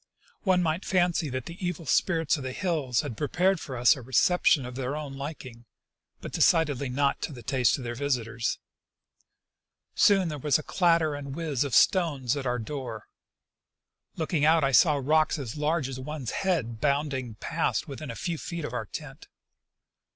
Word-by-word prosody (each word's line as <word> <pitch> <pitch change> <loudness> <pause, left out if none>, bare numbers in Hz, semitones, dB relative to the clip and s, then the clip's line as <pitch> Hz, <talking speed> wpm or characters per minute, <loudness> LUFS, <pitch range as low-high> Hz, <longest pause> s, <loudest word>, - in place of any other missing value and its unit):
One 185 -2 +2
might 160 +2 -1
fancy 175 -4 +1
that 130 -1 -4
the 170 +3 -9
evil 175 -2 -3
spirits 165 +2 +2
of 145 - -6
the 130 -1 -4
hills 150 -9 0
had 145 -7 -6
prepared 180 - +1
for 130 -5 -6
us 120 +5 +5
a 135 - -9
reception 130 +3 +3
of 125 - -7
their 130 +2 -3
own 150 -2 -5
liking 135 -4 -8 0.3
— - - -48
but - - -7
decidedly 145 -5 +2
not 140 +2 0
to - - -3
the 120 -4 -10
taste 130 -2 +2
of 130 - -7
their 120 0 -4
visitors. 120 -3 -1 1.4
Soon 195 -4 +4
there 150 -2 -5
was 145 0 +2
a 155 - -7
clatter 165 -4 +2
and 140 -1 -6
whiz 155 -6 -1
of 140 -4 -2
stones 145 -9 +3
at 135 -2 -3
our 125 0 0
door. 120 -3 -6 1.1
Looking 160 -2 -1
out 160 +1 +5
I 135 - +2
saw 150 +3 +5
rocks 155 +4 +2
as 130 -6 -6
large 150 -1 0
as 130 -1 -6
one's 140 -2 -5
head 130 - -1
bounding 140 -5 -1
past - - -1
within 140 +1 -7
a 115 - -5
few 170 +1 -3
feet 170 -3 -5
of 125 - -6
our 110 -4 -3
tent. 145 +4 -9
145 Hz, 180 wpm, -27 LUFS, 130-160 Hz, 1.4 s, us